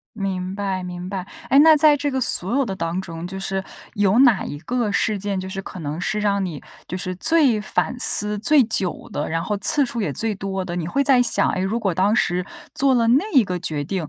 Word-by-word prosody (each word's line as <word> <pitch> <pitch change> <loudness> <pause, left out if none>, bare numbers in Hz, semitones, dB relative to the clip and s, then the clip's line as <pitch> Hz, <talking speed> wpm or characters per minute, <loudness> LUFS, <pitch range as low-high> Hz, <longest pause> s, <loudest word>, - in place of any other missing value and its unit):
明 190 -2 -4
白， 195 -2 -3
明 180 0 -7
白， 195 -1 -5 0.2
哎， 275 - +5
那 315 +1 +7
在 300 0 +5
这 290 0 -2
个 265 - -2
所 235 -3 +2
有 275 - +1
的 195 - -5
当 170 0 -3
中， 165 -2 -8
就 190 +1 -7
是 195 0 -3 0.3
有 205 +1 +1
哪 245 -7 +4
一 145 - -6
个 230 +5 -2
事 205 0 0
件， 200 -1 -3
就 185 - -6
是 195 +1 -5
可 185 - -10
能 155 +3 -5
是 210 - -2
让 200 -2 0
你 160 -6 -6 0.3
就 185 - -5
是 185 0 -4
最 275 - +2
反 215 - -2
思 210 -3 +5
最 285 +6 +4
久 195 -6 -3
的， 145 - -3
然 165 +1 -2
后 210 - -2
次 290 +5 +3
数 235 -2 -4
也 170 - -2
最 220 +9 -2
多 195 -1 -4
的， 175 - -5
你 170 -2 -3
会 280 +10 0
在 260 -2 +4
想， 240 - +2
诶， - - -3
如 205 +5 -1
果 195 -5 -1
当 195 +5 +1
时 180 -3 0 0.3
做 270 -2 +3
了 230 -1 +2
那 265 - +3
一 260 -6 +5
个 180 -2 -4
决 155 -4 -3
定， 165 0 -4
195 Hz, 260 characters per minute, -21 LUFS, 180-235 Hz, 0.3 s, 那